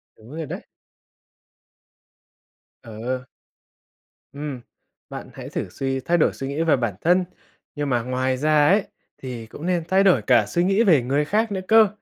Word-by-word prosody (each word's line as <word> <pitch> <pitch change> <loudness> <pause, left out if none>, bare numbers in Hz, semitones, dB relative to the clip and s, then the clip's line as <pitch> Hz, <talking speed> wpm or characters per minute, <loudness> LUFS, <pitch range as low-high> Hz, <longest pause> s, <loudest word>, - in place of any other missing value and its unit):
Đúng 110 +4 -16
rồi 160 -1 -4
đấy. - - -7 2.2
Ờ. 125 +3 -5 1.1
Ừm, 140 -3 -6 0.5
bạn - - -8
hãy - - -8
thử - - -4
suy 135 +6 -2
thay 175 +6 +1
đổi 160 - +3
suy 135 - -6
nghĩ 140 +3 -2
về 160 -2 +4
bản 120 -6 -1
thân, 180 +2 +3 0.5
nhưng 145 -1 -2
mà 120 -2 +1
ngoài 130 +1 -1
ra 150 +1 +3
ấy, 195 +4 +4 0.3
thì 125 -4 -7
cũng 145 +8 -9
nên 175 -2 0
thay 190 +2 +3
đổi 180 - +4
cả 105 +1 +4
suy 170 +12 0
nghĩ 195 +5 +3
về 165 - +5
người 140 +5 0
khác 215 +6 0
nữa 190 -2 -2
cơ. 220 -1 +7
145 Hz, 170 wpm, -23 LUFS, 125-175 Hz, 2.2 s, cơ